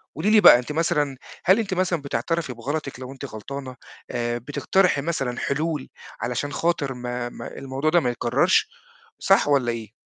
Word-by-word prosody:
قُولِي 165 +8 0
لي 215 0 +6
بقى 120 - +9
أنتِ 125 +4 -6
مثلًا 150 -4 0 0.3
هل 190 +5 +5
أنتِ 200 -4 -2
مثلًا 180 -3 0
بتعترفي 140 +2 -2
بغلطِك 135 +2 -4
لو 130 0 -7
أنتِ 135 - -8
غلطانة؟ 130 +4 -7 0.4
آآ 120 0 -1
بتقترحي 145 - +1
مثلًا 135 -6 -2
حلول 150 0 -2 0.3
علشان 125 +4 -2
خاطر 150 -4 0
ما 125 0 -4
ما - - -9
الموضوع 135 +3 -2
ده 175 - +5
ما 125 - 0
يتكررش 120 - +2 0.5
صح - - +4
والّا 130 -4 +3
إيه؟ 110 -2 -7
140 Hz, 165 wpm, -24 LUFS, 125-165 Hz, 0.5 s, بقى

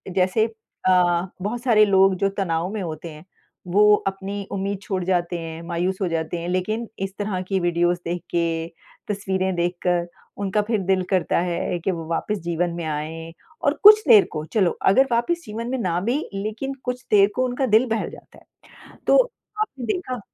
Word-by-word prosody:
जैसे 190 +4 +3
अ, 185 -5 0
बहुत 220 +5 -3
सारे 215 -4 +5
लोग 195 -1 +4
जो 195 +2 +1
तनाव 170 -3 -1
में 215 - -3
होते 165 -1 -6
हैं, 155 +2 -13 0.4
वो 210 +3 +5
अपनी 195 +1 -4
उम्मीद 195 +1 -2
छोड़ 190 -4 -3
जाते 175 -1 0
हैं, 165 0 -7
मायूस 175 +2 -2
हो 190 - +1
जाते 165 0 -2
हैं, 170 - -5
लेकिन 215 +6 -1
इस 195 0 -3
तरह 200 -3 -2
की 195 -1 0
वीडियोज़ 175 0 +1
देख 175 +1 -3
के, 165 -1 0 0.5
तस्वीरें 190 -2 -1
देखकर, 175 0 0 0.3
उनका 200 +1 0
फिर 220 -3 +2
दिल 185 0 +1
करता 185 -3 +1
है 175 +1 -2
कि 175 - -1
वो 165 -3 -5
वापस 210 +5 -1
जीवन 170 +1 0
में 170 - -4
आएँ। 160 +2 -4 0.3
और 285 - +2
कुछ 425 +1 +10
देर 215 -6 +8
को, 155 - -4
चलो 190 0 +1 0.2
अगर 265 +7 +4
वापस 240 +9 +1
जीवन 225 +2 -5
में 265 - -1
ना 180 -7 0
भी, 240 +8 0 0.2
लेकिन 215 +7 -4
कुछ 250 0 -4
देर 200 -1 +6
को 255 - +1
उनका 255 +2 -1
दिल 225 +1 +4
बहल 225 0 -1
जाता - - -15
है। - - -31 0.4
तो - - +6 0.4
आपने 275 - -3
देखा 255 -1 -3
190 Hz, 185 wpm, -23 LUFS, 175-215 Hz, 0.5 s, कुछ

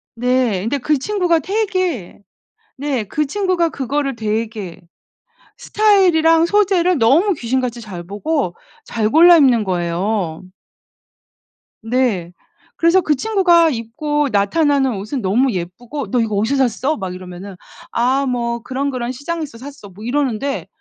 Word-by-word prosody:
네. 245 -5 +1
근데 230 +7 -1
그 300 +3 +1
친구가 355 +1 +1
되게 370 - -2 0.6
네 270 -5 -2
그 300 +9 -1
친구가 365 +1 0
그거를 275 -1 -2
되게 215 -4 -4 0.8
스타일이랑 350 -6 +3
소재를 365 -3 +2
너무 295 - +3
귀신같이 250 -3 -2
잘 185 -6 -8
보고 205 - -2 0.3
잘 220 -2 -1
골라 340 +6 +7
입는 250 -7 +4
거예요. 180 -1 -2 1.4
네. 225 -8 -1 0.4
그래서 335 +3 +3
그 310 -3 +1
친구가 350 -1 +3
입고 290 +5 -2
나타나는 270 +5 +2
옷은 215 +7 -4
너무 235 +7 +2
예쁘고 225 +11 -6
"너 250 - +2
이거 220 -3 -1
어디서 255 +5 +2
샀어?" 265 +7 -2
막 190 -3 -5
이러면은 185 +1 -9 0.4
"아 260 +4 +1
뭐 235 -2 -2
그런, 270 +3 -2
그런 245 -1 -3
시장에서 300 0 -5
샀어." 270 -4 -11
뭐 195 +3 -13
이러는데 270 0 -2
260 Hz, 275 characters per minute, -18 LUFS, 215-315 Hz, 1.4 s, 골라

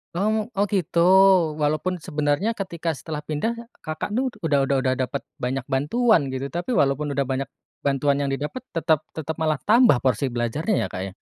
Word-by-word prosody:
Oh 195 +4 +1
mu 220 - +1 0.2
oh 205 - +3
gitu. 190 -4 0 0.6
Walaupun 155 +4 0
sebenarnya 150 +6 0
ketika 170 -6 -3
setelah 150 0 -6
pindah 155 +10 -2 0.2
Kakak 155 +5 -5
tuh 255 +5 0 0.2
udah 145 -3 +2
udah 140 0 +2
udah 130 -1 +2
dapat 130 +1 -2 0.2
banyak 125 +1 -2
bantuan 160 - +2
gitu. 130 +1 -4
Tapi 175 +8 -2
walaupun 140 -1 +1
udah 140 - +2
banyak 135 +1 -2 0.3
bantuan 140 0 +1
yang 140 - 0
didapet, 145 - -3 0.2
tetap 160 -2 +2 0.2
tetap 160 0 -5
malah 155 -1 +1
tambah 230 - +5
porsi 130 +1 +1
belajarnya 125 - -1
ya, - - -4
Kak, 95 - -5
ya? 95 - -9
150 Hz, 180 wpm, -23 LUFS, 135-180 Hz, 0.6 s, tambah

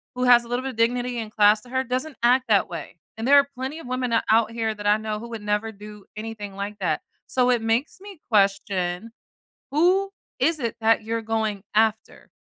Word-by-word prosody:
who 250 - -2
has 245 -1 +7
a - - -13
little 245 +1 -1
bit 265 - -3
of - - -14
dignity 245 +1 0
and 220 -2 -6
class 210 0 +4
to 245 - -17
her 260 +1 0
doesn't 260 +4 -3
act 250 +2 +4
that 200 -3 +4
way, 170 -1 -8 0.2
and 225 +2 -3
there 285 +1 +7
are 280 0 +5
plenty 265 +5 -5
of 325 - -10
women 255 -1 -2
o 230 - +4
out 225 0 +3
here 225 -1 -2
that 205 0 -5
I 210 +1 +5
know 215 -1 -4
who 235 +2 -9
would 225 -3 -7
never 210 +2 -1
do 210 -1 -12
anything 215 -2 -7
like 200 +1 -5
that. 165 -5 -1 0.3
So 250 -1 +2
it 240 -2 +1
makes 225 +9 -1
me 400 -4 -11
question, 195 -1 +1 0.6
who 365 +7 +3 0.3
is 325 -1 +2
it 235 -4 -2
that 225 0 +3
you're 225 +1 -2
going 220 -2 -1
after? 220 0 0
225 Hz, 220 wpm, -24 LUFS, 210-250 Hz, 0.6 s, has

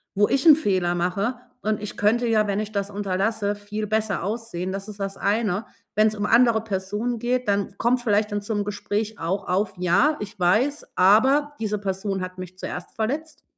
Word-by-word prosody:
wo 205 +1 +4
ich 270 +2 +1
'n 305 - +10
Fehler 185 - +1
mache, 195 +8 -1 0.2
und 215 -1 -1
ich 210 - -6
könnte 235 +4 +2
ja, 215 -2 +3
wenn 200 +1 0
ich 215 0 -4
das 200 -1 -2
unterlasse, 205 +1 -1
viel 205 +1 -5
besser 215 -2 0
aussehen“, 200 -4 -3
das 195 +1 -5
ist 205 -1 -10
das 195 0 -4
eine. 205 0 0 0.3
Wenn's 215 +1 +3
um 205 0 -2
andere 230 -1 +4
Personen 210 +3 -2
geht, 245 0 -1
dann 200 -1 0
kommt 245 +1 +2
vielleicht 210 -2 +2
dann 205 0 -1
zum 205 -1 -2
Gespräch 210 +1 -3
auch 170 +4 -2
auf: 195 +3 0
„Ja, 180 - +3
ich 210 0 -7
weiß, 230 - +2
aber 265 +10 +4
diese 210 -1 -1
Person 195 0 -2
hat 185 0 -6
mich 185 0 -8
zuerst 180 - -6
verletzt.“ 295 +7 -3
210 Hz, 190 wpm, -24 LUFS, 195-225 Hz, 0.3 s, n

